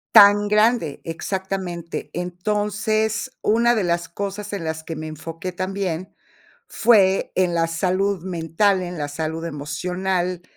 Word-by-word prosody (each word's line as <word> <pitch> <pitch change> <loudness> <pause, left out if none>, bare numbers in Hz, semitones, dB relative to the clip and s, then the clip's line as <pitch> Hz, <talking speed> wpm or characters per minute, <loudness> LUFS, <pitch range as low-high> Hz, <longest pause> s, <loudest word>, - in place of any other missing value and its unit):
Tan 205 -1 +8
grande, 210 - +2
exactamente. 180 0 -4
Entonces, 210 +5 -1
una 235 +3 +3
de 215 - +1
las 170 -1 0
cosas 200 +2 -5
en 190 -5 -3
las 160 0 -3
que 160 0 -5
me 155 +1 -5
enfoqué 165 +3 -6
también 185 -1 -3 0.5
fue 200 -5 +4
en 180 -2 +1
la 165 - +3
salud 185 +3 0
mental, 185 +2 +1
en 175 -2 -5
la 145 - -2
salud 160 +2 -3
emocional, 180 +4 -2
185 Hz, 130 wpm, -22 LUFS, 165-200 Hz, 0.5 s, Tan